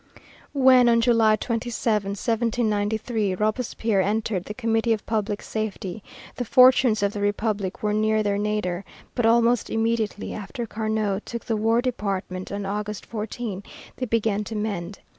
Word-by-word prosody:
When, 255 Hz, -2 st, +6 dB
on 230 Hz, 0 st, +4 dB
July 230 Hz, -2 st, +4 dB
27, 230 Hz, +1 st, -1 dB, 0.2 s
1793, 220 Hz, -1 st, 0 dB
Robespierre 215 Hz, 0 st, 0 dB
entered 205 Hz, -1 st, -1 dB
the 210 Hz, -, -6 dB
Committee 225 Hz, -1 st, +1 dB
of 215 Hz, -, -4 dB
Public 210 Hz, -2 st, -2 dB
Safety, 215 Hz, -2 st, -4 dB, 0.4 s
the 245 Hz, -, -1 dB
fortunes 250 Hz, -3 st, +5 dB
of 200 Hz, 0 st, +1 dB
the 205 Hz, -, -4 dB
Republic 205 Hz, -1 st, -1 dB
were 210 Hz, 0 st, +1 dB
near 215 Hz, 0 st, +2 dB
their 200 Hz, -1 st, 0 dB
nadir, 205 Hz, -3 st, -1 dB, 0.3 s
but 240 Hz, -3 st, +1 dB
almost 235 Hz, +1 st, +3 dB
immediately, 225 Hz, -2 st, -1 dB
after 225 Hz, +4 st, -5 dB
Carnot 215 Hz, -2 st, -2 dB
took 235 Hz, -1 st, -6 dB
the 225 Hz, -, 0 dB
War 225 Hz, +3 st, +2 dB
Department 195 Hz, -6 st, -3 dB
on 200 Hz, 0 st, -3 dB
August 210 Hz, +1 st, -4 dB
14, 215 Hz, -2 st, -5 dB, 0.4 s
they 255 Hz, -, -3 dB
began 215 Hz, -2 st, +1 dB
to 225 Hz, -, -6 dB
mend. 200 Hz, -3 st, -3 dB
215 Hz, 145 wpm, -24 LUFS, 205-230 Hz, 0.4 s, When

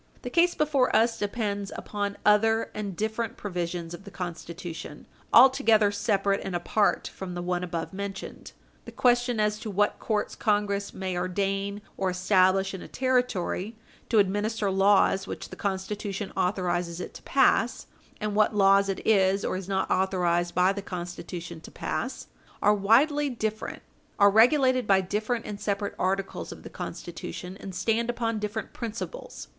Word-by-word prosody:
The 245 Hz, -, -5 dB
case 345 Hz, +3 st, +3 dB
before 290 Hz, -4 st, +2 dB
us 230 Hz, 0 st, +3 dB
depends 205 Hz, -1 st, -2 dB
upon 205 Hz, -1 st, -3 dB
other 225 Hz, +2 st, +3 dB
and 205 Hz, -3 st, -4 dB
different 220 Hz, +3 st, -2 dB
provisions 175 Hz, -3 st, -4 dB
of 175 Hz, -, -9 dB
the 200 Hz, -, -10 dB
Constitution 170 Hz, -4 st, -7 dB, 0.3 s
altogether 225 Hz, -5 st, +6 dB
separate 200 Hz, -1 st, +1 dB
and 190 Hz, -2 st, -4 dB
apart 200 Hz, +4 st, +1 dB
from 180 Hz, -2 st, -6 dB
the 175 Hz, -, -3 dB
one 180 Hz, 0 st, -1 dB
above 170 Hz, 0 st, -4 dB
mentioned. 195 Hz, 0 st, -6 dB, 0.3 s
The -, -, -9 dB
question 245 Hz, -1 st, +2 dB
as 210 Hz, 0 st, +1 dB
to 220 Hz, -, -6 dB
what 205 Hz, +1 st, +1 dB
courts 215 Hz, -2 st, -1 dB
Congress 205 Hz, -2 st, 0 dB
may 190 Hz, -1 st, -4 dB
ordain 195 Hz, +3 st, -2 dB
or 190 Hz, -1 st, 0 dB
establish 185 Hz, +1 st, +3 dB
in 190 Hz, -, -6 dB
a -, -, -9 dB
Territory 245 Hz, -5 st, -1 dB, 0.3 s
to 230 Hz, -, +2 dB
administer 205 Hz, +1 st, +1 dB
laws 195 Hz, 0 st, +3 dB
which -, -, -6 dB
the -, -, -8 dB
Constitution 200 Hz, +1 st, -3 dB
authorizes 175 Hz, -2 st, -1 dB
it -, -, -6 dB
to -, -, -11 dB
pass, 255 Hz, -3 st, +2 dB, 0.3 s
and 210 Hz, -1 st, -2 dB
what 215 Hz, +1 st, +3 dB
laws 195 Hz, 0 st, +5 dB
it 195 Hz, -, -3 dB
is 195 Hz, -2 st, +3 dB
or -, -, -1 dB
is 185 Hz, 0 st, -6 dB
not 190 Hz, -1 st, 0 dB
authorized 175 Hz, -2 st, +1 dB
by 180 Hz, +2 st, +4 dB
the 200 Hz, -, -5 dB
Constitution 175 Hz, -2 st, -7 dB
to -, -, -11 dB
pass, -, -, -4 dB, 0.3 s
are 210 Hz, -, +4 dB
widely 275 Hz, +9 st, +3 dB
different 220 Hz, -3 st, -4 dB, 0.3 s
are 200 Hz, -1 st, +6 dB
regulated 255 Hz, +2 st, +4 dB
by 195 Hz, -1 st, +5 dB
different 215 Hz, +5 st, -2 dB
and 205 Hz, -1 st, -6 dB
separate 200 Hz, 0 st, -2 dB
articles 195 Hz, +1 st, -2 dB
of -, -, -10 dB
the -, -, -10 dB
Constitution, 180 Hz, +1 st, -7 dB
and 190 Hz, -2 st, -8 dB
stand 230 Hz, +4 st, 0 dB
upon 230 Hz, -2 st, -1 dB
different 210 Hz, +1 st, -4 dB
principles. 235 Hz, -, -6 dB
200 Hz, 160 wpm, -27 LUFS, 185-220 Hz, 0.3 s, altogether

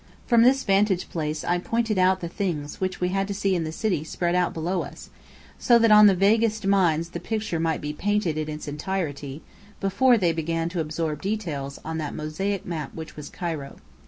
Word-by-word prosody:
From 235 Hz, -2 st, +4 dB
this 260 Hz, +3 st, +5 dB
vantage 195 Hz, -1 st, +2 dB
place 155 Hz, -2 st, -3 dB
I 175 Hz, 0 st, +1 dB
pointed 225 Hz, +1 st, 0 dB
out 185 Hz, +1 st, +3 dB
the 170 Hz, -, -3 dB
things 165 Hz, -5 st, -4 dB
we 185 Hz, -1 st, -1 dB
had 195 Hz, +1 st, 0 dB
to 200 Hz, -, -4 dB
see 195 Hz, -1 st, +1 dB
in 170 Hz, -3 st, 0 dB
the 155 Hz, -, -4 dB
city 180 Hz, -3 st, -1 dB
spread 175 Hz, +2 st, -2 dB
out 180 Hz, -1 st, +2 dB
below 175 Hz, +3 st, -2 dB
us, -, -, -10 dB, 0.5 s
so 240 Hz, -2 st, +5 dB
that 230 Hz, -1 st, +4 dB
on 210 Hz, 0 st, +9 dB
the 195 Hz, -, +5 dB
vaguest 215 Hz, +2 st, +2 dB
minds 170 Hz, -4 st, +2 dB
the -, -, -6 dB
picture 210 Hz, -6 st, -2 dB
might 165 Hz, -1 st, 0 dB
be 150 Hz, 0 st, -4 dB
painted 205 Hz, -1 st, 0 dB
in 155 Hz, 0 st, -3 dB
its 150 Hz, 0 st, -6 dB
entirety, 150 Hz, -2 st, -4 dB, 0.4 s
before 220 Hz, +6 st, +3 dB
they 175 Hz, -5 st, +2 dB
began 165 Hz, +1 st, -1 dB
to 175 Hz, 0 st, -4 dB
absorb 155 Hz, -1 st, -2 dB
details 165 Hz, -10 st, -3 dB
on 160 Hz, 0 st, -3 dB
that 150 Hz, -2 st, -4 dB
mosaic 190 Hz, +6 st, -3 dB
map 160 Hz, -5 st, -5 dB
which 160 Hz, -1 st, -8 dB
was 150 Hz, -1 st, -8 dB
Cairo. 160 Hz, -6 st, -5 dB
180 Hz, 200 wpm, -25 LUFS, 155-200 Hz, 0.5 s, on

